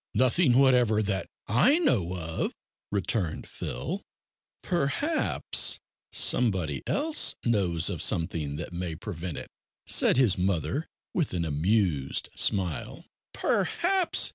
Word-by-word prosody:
"Nothing 130 +1 +3
whatever, 125 -5 +4
that 100 -2 -2 0.2
I 250 - +4
know 95 - +1
of," 80 -1 -3 0.4
returned 100 -4 -2
Phil. - - -5 0.6
"Perhaps 185 - +1 0.3
somebody 90 - +2
else 310 +2 +2
knows 95 -8 +1
of - - -2
something 80 -3 0
that 80 +3 -7
may 85 -2 -4
prevent 85 -2 -6
it," - - -8 0.3
said - - +3
his 115 -8 +4
mother 95 - -1 0.3
with 155 - -1
an 85 -1 -1
amused 80 -2 0
smile. 90 -7 -1 0.3
"Perhaps!" 370 0 +2
100 Hz, 110 wpm, -27 LUFS, 85-130 Hz, 0.6 s, whatever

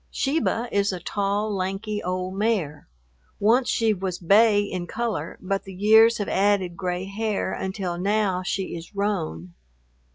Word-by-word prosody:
Sheba 270 -4 0
is 200 0 +1
a 185 - -4
tall, 205 +3 -1
lanky 195 +3 -3
old 185 +1 -3
mare. 195 -8 -1 0.5
Once 235 +5 +3
she 225 -1 +2
was 185 -2 -3
bay 205 +4 +4
in 185 -3 -4
color, 235 +5 -3
but 195 +1 -2
the 190 -1 -10
years 220 +4 +6
have 205 - -3
added 195 -3 +1
gray 180 -1 -3
hair 205 0 -2
until 190 -2 -3
now 200 -1 +1
she 185 0 -3
is 170 +4 -10
roan. 90 - -2
200 Hz, 150 wpm, -24 LUFS, 185-215 Hz, 0.5 s, years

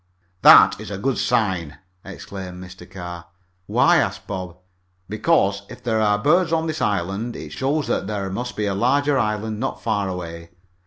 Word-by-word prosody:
"That's - - +7
a 100 - -5
good 130 +6 -1
sign!" 95 -10 0 0.3
exclaimed 95 -2 -8
Mr. 90 -1 -12
Carr. 85 -2 -8 0.4
"Why?" - - +4
asked - - -1
Bob. 90 -3 -6 0.5
"Because 105 -3 +1
if 125 - -11
there 110 -2 0
are 105 -1 +3
birds 165 - +2
on 165 -1 +1
this 155 -1 -3
small - - +1
island, 100 +5 -3
it 75 - -8
shows 140 - -1
that - - -1
there 100 -2 -3
must 120 +2 -4
be 105 - -1
a 100 - -1
larger 140 +7 +2
island 105 -1 -2
not 130 - -4
far 105 -4 0
away. 85 -2 -7
105 Hz, 170 wpm, -22 LUFS, 95-125 Hz, 0.5 s, That's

